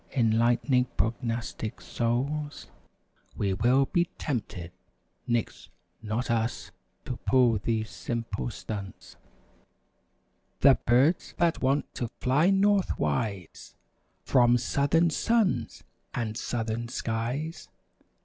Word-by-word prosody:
Enlightening 120 +2 +3
prognostic 115 0 -2
souls. 140 - -2 0.7
Will 100 -2 0 0.4
we 175 -2 +4
be - - -36
tempted—nix, 100 - -5 0.3
not 110 +3 -2
us— 115 0 -1 0.3
To 125 - -4
pull 125 -5 +3
these 110 0 -2
simple 115 0 -4
stunts. 100 -4 -7 1.5
The 135 -1 +6
birds 130 +9 +3
that 170 -1 +1
want 135 +2 0
to 120 - -3
fly 140 +8 +3
northwise 185 - 0 0.5
From 120 -2 +4
southern 145 +7 +2
suns 225 +3 0 0.3
and 110 -2 -2
southern 115 -1 -3
skies. 120 +8 -3
120 Hz, 90 wpm, -28 LUFS, 115-140 Hz, 1.5 s, The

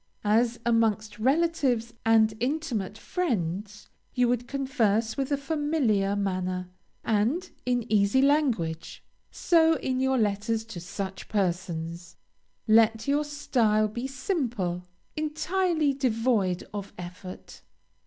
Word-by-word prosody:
As 230 +3 +2
amongst 220 -2 +1
relatives 265 -3 +1
and 220 -1 +4
intimate 245 - -2
friends 210 - -3 0.3
you 250 -1 +3
would 245 0 0
converse 230 -6 0
with 275 +1 -2
a 285 - +2
familiar 280 -10 0
manner, 185 -2 -2 0.3
and 235 - 0 0.2
in 245 -2 +1
easy 205 +2 +3
language, 255 - +1 0.3
so 325 -2 +3
in 260 -4 -2
your 265 0 +2
letters 220 +1 0
to 225 -6 -8
such 190 +2 -6
persons, 175 -3 -2 0.5
let 225 +1 +4
your 290 +2 +2
style 235 -8 +1
be 235 +5 -4
simple, 245 - -2 0.3
entirely 315 0 0
devoid 225 -8 +1
of 200 -1 -6
effort. 180 +1 -9
225 Hz, 110 wpm, -27 LUFS, 200-275 Hz, 0.5 s, and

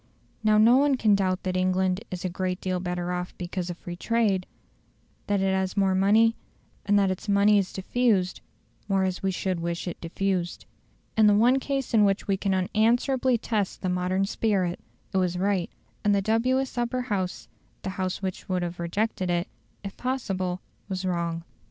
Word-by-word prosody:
Now 215 0 +4
no 230 +4 +6
one 280 -1 +3
can 215 -4 +3
doubt 185 -2 +1
that 185 -1 -2
England 185 +1 +1
is 185 0 -5
a - - +2
great 185 +1 -2
deal 185 -1 -2
better 180 0 -3
off 180 0 -4
because 180 0 -4
of 175 - -5
free 175 0 -7
trade; 205 -2 +1 0.8
that 205 -1 +1
it 195 0 +2
has 190 +1 -1
more 195 -1 +3
money, 215 +4 +4 0.5
and 205 0 +4
that 195 -2 +3
its 185 +3 -5
money 200 +1 +5
is 190 - -2
diffused 195 -2 0 0.5
more 195 -1 +2
as 185 -1 -1
we 195 - 0
should 185 -1 -2
wish 170 +1 -3
it 175 - -5
diffused. 175 +1 -2 0.5
In 220 -1 +5
the 205 - +5
one 245 +5 +4
case 270 -2 -3
in 215 -2 +6
which 195 -1 +1
we 195 - +2
can 195 0 0
unanswerably 235 +6 +2
test 215 -4 -2
the 185 - 0
modern 180 +2 0
spirit, 195 -4 0 0.3
it - - +1
was 180 -1 +1
right, 190 -2 0 0.3
and 205 -1 +3
the 200 - +2
dubious 250 +4 +1
Upper 240 +1 -1
House 200 -7 -3 0.4
the 190 - -3
House 185 +1 -3
which 190 0 -4
would 180 -1 0
have 175 0 -5
rejected 185 +2 -1
it, 175 0 0 0.4
if 195 -1 -6
possible 190 -8 -2 0.3
was 190 0 -3
wrong. 170 -2 -1
190 Hz, 185 wpm, -26 LUFS, 180-215 Hz, 0.8 s, no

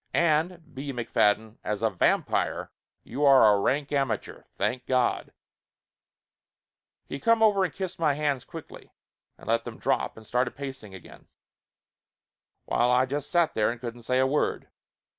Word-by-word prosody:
And, 170 +1 +1
B. 135 +2 -5
McFadden, 110 -2 0
as 105 -1 -3
a - - +2
vam - - +2
pire - - -2 0.3
you 135 +6 -4
are 135 -7 +7
a 100 - +2
rank 140 +7 0
amateur 135 -4 -2
thank 125 0 -2
God 130 -2 0 0.9
!" - - -61
He 140 - -5
come 230 +6 +3
over 205 -3 +4
and 180 - -1
kissed 190 0 -6
my 150 -4 +2
hands 145 -4 -1
quickly, 165 +2 -11 0.4
and - - -15
let - - +1
them - - -8
drop - - -1
and 110 - -12
started 125 +3 -1
pacing 135 -8 -8
again, 95 - -14 1.4
while 120 - +1
I 125 +1 +4
just 140 +2 -4
sat 175 -3 +2
there 105 - +2
and 120 - -4
couldn't 120 0 -7
say 125 +2 0
a 130 - +4
word. 140 +3 -1
135 Hz, 160 wpm, -27 LUFS, 120-150 Hz, 1.4 s, are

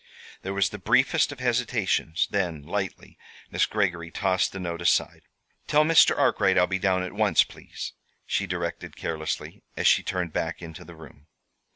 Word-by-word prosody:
There 95 +1 -4
was 100 -1 +2
the 105 - -8
briefest 135 - +3
of 145 - -9
hesitations; 115 -9 0
then, 85 -7 -1
lightly, 95 +4 -5 0.3
Miss - - +2
Greggory 85 -5 -1
tossed 95 +1 0
the 95 - -7
note 85 -2 -4
aside. 85 - +1 0.5
"Tell 150 +1 +4
Mr. 165 +1 +5
Arkwright - - +3
I'll 90 - +5
be 95 +1 -2
down 95 -1 +1
at 90 - -6
once, 105 -5 +4
please," - - -9 0.3
she - - -1
directed - - -4
carelessly, 80 -1 -4 0.2
as - - -2
she - - +5
turned 90 -4 -3
back 80 +1 -2
into 80 -2 -9
the 85 - -13
room. 75 -2 -15
95 Hz, 170 wpm, -26 LUFS, 85-105 Hz, 0.5 s, Mr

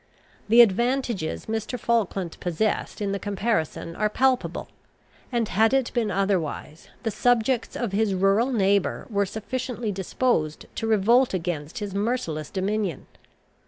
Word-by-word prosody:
The 235 +2 +8
advantages 235 -4 +1
Mr. 225 +3 -3
Falkland 200 -7 0
possessed 190 +5 -1
in 200 -1 -1
the 200 - -2
comparison 200 -5 -2
are 210 0 +1
palpable; 255 +3 +1 0.6
and 235 -3 0
had 220 +6 +3
it 265 -3 0
been 235 -4 +1
otherwise, 185 -5 -2 0.2
the 225 - -1
subjects 240 +2 +1
of 235 -5 -2
his 200 -1 +1
rural 195 +7 +3
neighbour 200 -4 +1
were 200 -1 +1
sufficiently 240 +1 -4
disposed 190 -4 -1
to 225 - -3
revolt 225 +2 +4
against 165 -4 -4
his 205 -2 -4
merciless 200 - -2
dominion. 195 -4 -2
210 Hz, 130 wpm, -25 LUFS, 190-235 Hz, 0.6 s, The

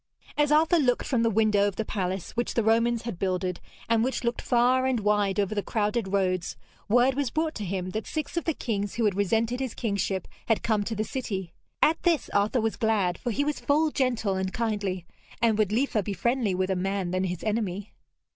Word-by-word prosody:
As 295 0 +2
Arthur 325 +3 +4
looked 250 -4 +2
from 250 -4 +1
the 230 - +3
window 210 -2 +3
of 200 - -3
the 220 - -2
palace 190 -3 -3
which 240 +1 -2
the 230 - +2
Romans 230 +1 +2
had 230 -7 -5
builded, 185 -2 -1 0.3
and 225 0 +3
which 260 +1 -1
looked 235 0 -1
far 250 +2 +3
and 250 -4 0
wide 205 -1 +1
over 200 +1 +1
the 205 - 0
crowded 210 +1 -1
roads, 185 -2 0 0.3
word 245 +4 +4
was 275 -1 -1
brought 315 +4 -1
to 210 - -5
him 185 -1 -3
that 220 +3 -4
six 310 +1 -4
of 340 - -1
the 325 - 0
kings 205 -4 -2
who 235 - +1
had 205 - +3
resented 225 +5 +1
his 260 -4 -3
kingship 200 -4 -1 0.2
had 225 - +1
come 215 -2 +1
to 225 - -3
the 215 - 0
city. 195 -8 -4 0.3
At 320 +2 +3
this 340 -4 +1
Arthur 210 +4 +2
was 225 0 -1
glad, 205 -6 +1
for - - -3
he 265 +5 0
was 300 0 -1
full 305 +2 +2
gentle 240 -8 0
and 190 0 -2
kindly, 205 -6 -2 0.3
and 230 -1 +3
would 210 -2 +2
liefer 230 -1 +1
be 200 +1 -3
friendly 235 0 0
with 185 +1 0
a - - +1
man 190 0 -1
than 185 +1 0
his 180 -2 -4
enemy. 210 -2 -2
215 Hz, 220 wpm, -27 LUFS, 195-245 Hz, 0.3 s, Arthur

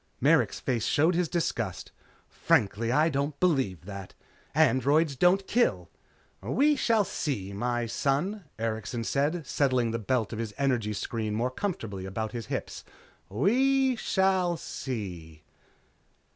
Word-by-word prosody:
Merrick's - - +3
face 115 -4 -1
showed 160 +5 +3
his 175 -2 0
disgust. 170 -2 -2 0.4
"Frankly, 110 +3 +1
I 150 +5 +4
don't 140 -1 -2
believe 135 - +1
that. 100 -2 -8 0.4
Androids 150 0 +3
don't 180 +7 +3
kill." 95 - +1 0.5
"We 275 - +2
shall 225 -5 +2
see, 105 - -3
my 120 +3 -1
son," 160 - -1
Erikson 110 +1 -3
said 150 +7 0
settling 130 -4 +1
the 115 - -2
belt 115 +1 -1
of 110 - -5
his 110 -3 -4
energy 125 -6 0
screen 110 +1 -3
more 120 +3 0
comfortably 115 - -4
about 110 +3 -4
his 115 -3 -6
hips. - - -4 0.5
"We 260 - +2
shall 190 -5 +1
see." 90 - -6
130 Hz, 130 wpm, -28 LUFS, 110-170 Hz, 0.5 s, I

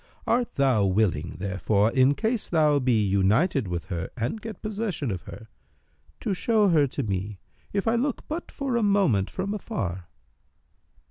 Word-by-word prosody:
Art 240 0 0
thou 130 -7 +3
willing, 90 -5 0
therefore, 100 +3 +1
in 130 +3 +4
case 225 - -1
thou 150 -3 +3
be 120 -5 +2
united 105 - +2
with 90 0 -3
her 85 -3 -3
and 120 - -2
get 225 0 -8
possession 205 - -2
of 90 -2 -4
her, 110 - -10 0.7
to - - -1
show 210 +1 +2
her 150 -5 +4
to 140 +2 -3
me, 100 -1 -3 0.3
if 200 +2 -1
I 225 - +3
look 250 +3 -1
but 325 +3 -5
for 270 -3 -2
a - - +1
moment 195 - +2
from 195 +2 -3
afar?" 95 - -4
135 Hz, 160 wpm, -26 LUFS, -, 0.7 s, in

